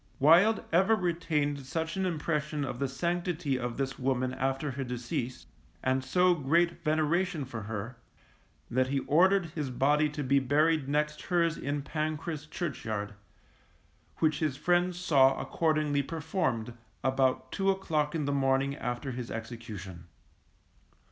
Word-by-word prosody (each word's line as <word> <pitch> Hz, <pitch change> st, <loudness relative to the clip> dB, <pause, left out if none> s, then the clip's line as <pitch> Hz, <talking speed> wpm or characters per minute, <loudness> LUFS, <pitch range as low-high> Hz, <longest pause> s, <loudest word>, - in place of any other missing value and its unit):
Wild 175 Hz, +10 st, +5 dB
ever 190 Hz, +6 st, +5 dB
retained 160 Hz, -6 st, -1 dB
such 160 Hz, +5 st, -3 dB
an 190 Hz, -1 st, 0 dB
impression 150 Hz, -3 st, -1 dB
of 125 Hz, -2 st, -5 dB
the 140 Hz, -, 0 dB
sanctity 170 Hz, -1 st, -1 dB
of 120 Hz, -1 st, -4 dB
this 135 Hz, -1 st, -3 dB
woman 130 Hz, -1 st, 0 dB
after 135 Hz, +2 st, -1 dB
her 135 Hz, +1 st, -4 dB
decease, 125 Hz, 0 st, -4 dB, 0.4 s
and 130 Hz, 0 st, +1 dB
so 180 Hz, +7 st, +3 dB
great 170 Hz, +3 st, +1 dB
veneration 155 Hz, +1 st, +1 dB
for 120 Hz, -3 st, -6 dB
her, 110 Hz, +3 st, -5 dB, 0.7 s
that 130 Hz, +2 st, +2 dB
he 135 Hz, 0 st, 0 dB
ordered 175 Hz, +3 st, +3 dB
his 150 Hz, -5 st, -3 dB
body 145 Hz, +4 st, +2 dB
to 150 Hz, 0 st, -4 dB
be 140 Hz, +1 st, +3 dB
buried 145 Hz, +2 st, +2 dB
next 150 Hz, +1 st, 0 dB
hers 170 Hz, -3 st, +2 dB
in 145 Hz, +1 st, -3 dB
Pancras 155 Hz, 0 st, -3 dB
Churchyard, 110 Hz, -, -4 dB, 1.0 s
which 155 Hz, -2 st, +1 dB
his 150 Hz, -4 st, -1 dB
friends 175 Hz, +1 st, +1 dB
saw 135 Hz, -7 st, +4 dB
accordingly 155 Hz, -3 st, +1 dB
performed, 140 Hz, -, -2 dB, 0.3 s
about 130 Hz, -1 st, +1 dB
two 195 Hz, 0 st, 0 dB
o'clock 160 Hz, -6 st, 0 dB
in 155 Hz, -3 st, -1 dB
the 145 Hz, -, 0 dB
morning 135 Hz, 0 st, +1 dB
after 125 Hz, +3 st, -3 dB
his 125 Hz, -1 st, -5 dB
execution. 110 Hz, -6 st, -7 dB
145 Hz, 140 wpm, -30 LUFS, 130-165 Hz, 1.0 s, Wild